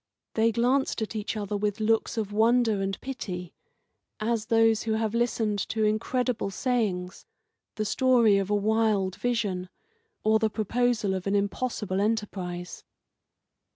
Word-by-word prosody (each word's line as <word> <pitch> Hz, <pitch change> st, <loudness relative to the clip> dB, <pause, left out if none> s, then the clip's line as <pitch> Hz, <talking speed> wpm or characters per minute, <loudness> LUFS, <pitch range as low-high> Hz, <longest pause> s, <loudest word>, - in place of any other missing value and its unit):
They 225 Hz, +1 st, +3 dB
glanced 245 Hz, +1 st, +1 dB
at 220 Hz, -, -6 dB
each 215 Hz, +1 st, -3 dB
other 205 Hz, 0 st, -3 dB
with 205 Hz, +1 st, -1 dB
looks 225 Hz, +1 st, +1 dB
of 210 Hz, -2 st, -2 dB
wonder 225 Hz, -1 st, +3 dB
and 195 Hz, 0 st, -2 dB
pity, 180 Hz, -10 st, -6 dB, 0.7 s
as 220 Hz, 0 st, -1 dB
those 225 Hz, -1 st, +4 dB
who 225 Hz, -, -1 dB
have 220 Hz, -1 st, -1 dB
listened 225 Hz, -3 st, 0 dB
to 220 Hz, -1 st, 0 dB
incredible 225 Hz, +2 st, 0 dB
sayings, 195 Hz, -6 st, -2 dB, 0.5 s
the 215 Hz, -, -2 dB
story 235 Hz, -4 st, +4 dB
of 195 Hz, 0 st, -2 dB
a 210 Hz, -, +2 dB
wild 210 Hz, -2 st, +1 dB
vision, 205 Hz, -7 st, -1 dB, 0.5 s
or 220 Hz, 0 st, +4 dB
the 220 Hz, -1 st, +2 dB
proposal 220 Hz, -1 st, 0 dB
of 190 Hz, 0 st, -3 dB
an 200 Hz, -, +1 dB
impossible 200 Hz, -1 st, -1 dB
enterprise. 190 Hz, -5 st, -3 dB
215 Hz, 140 wpm, -27 LUFS, 200-230 Hz, 0.7 s, those